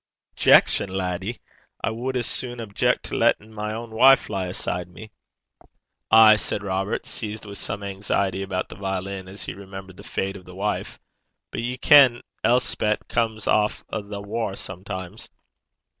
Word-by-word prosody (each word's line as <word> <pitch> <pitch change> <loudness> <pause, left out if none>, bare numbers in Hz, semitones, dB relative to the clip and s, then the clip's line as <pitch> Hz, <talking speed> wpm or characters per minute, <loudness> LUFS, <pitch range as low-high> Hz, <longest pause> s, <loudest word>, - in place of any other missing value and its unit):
'Objection, 100 - +5
laddie? 95 +4 -3 0.5
I - - +1
wad 125 +3 -2
as 120 - -1
sune 120 +1 -3
objeck 105 -3 0
to - - -5
lattin' 110 +1 +2
my 105 0 -3
ain 115 0 -7
wife 130 +2 +5
lie 95 -2 -2
aside 90 0 -3
me.' 105 +6 -12 1.0
'Ay,' 110 -1 +8
said 100 - -3
Robert, 95 +1 -2
seized 110 -1 -6
with 100 -1 -8
some 100 0 -5
anxiety 100 -1 -1
about 95 -1 -3
the - - -9
violin 95 -1 -4
as 95 0 -9
he - - -5
remembered 95 -1 -10
the - - -11
fate 95 +1 -3
of 90 - -15
the 90 - -12
wife, 105 +2 -3 0.5
'but - - -3
ye 125 +2 -3
ken 130 -3 +7 0.2
Elspet 115 -3 +1
comes 110 -2 -1
aff 105 0 +2
a' 110 - -3
the 100 0 -7
waur 110 -1 -3
sometimes.' 95 +1 -7
100 Hz, 160 wpm, -24 LUFS, 95-110 Hz, 1.0 s, Ay